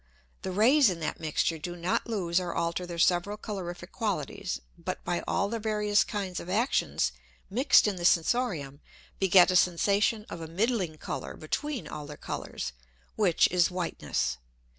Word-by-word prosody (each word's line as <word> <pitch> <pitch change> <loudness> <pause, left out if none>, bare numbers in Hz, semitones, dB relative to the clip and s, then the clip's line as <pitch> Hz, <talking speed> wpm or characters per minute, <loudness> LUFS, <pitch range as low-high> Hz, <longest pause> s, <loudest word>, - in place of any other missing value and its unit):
The - - -4
Rays 235 +7 +5
in 175 -2 -3
that 155 - -3
mixture 160 +1 0
do 175 +3 -5
not 175 +6 -1
lose 185 -6 0
or 180 -2 -4
alter 170 +2 -1
their 170 -1 -6
several 175 +4 +2
colorific 180 -4 -6
qualities, 200 - -3 0.2
but - - -5
by 175 - -1
all 200 - +1
their 230 +2 -3
various 210 -1 +2
kinds 195 -4 -4
of 175 - -8
Actions 225 +8 +1 0.4
mix'd 255 +2 +5
in 200 -3 -1
the 175 - -5
Sensorium, 165 - +1 0.4
beget 185 -1 +6
a - - 0
Sensation 200 +5 +2
of 165 - -7
a 160 - -5
middling 185 -2 -1
Colour - - -5
between 280 - -3
all 150 -1 -7
their 150 0 -9
Colours, - - -5 0.4
which 190 -6 +4
is 180 -1 +3
whiteness. 165 - -2
180 Hz, 160 wpm, -29 LUFS, 170-210 Hz, 0.4 s, beget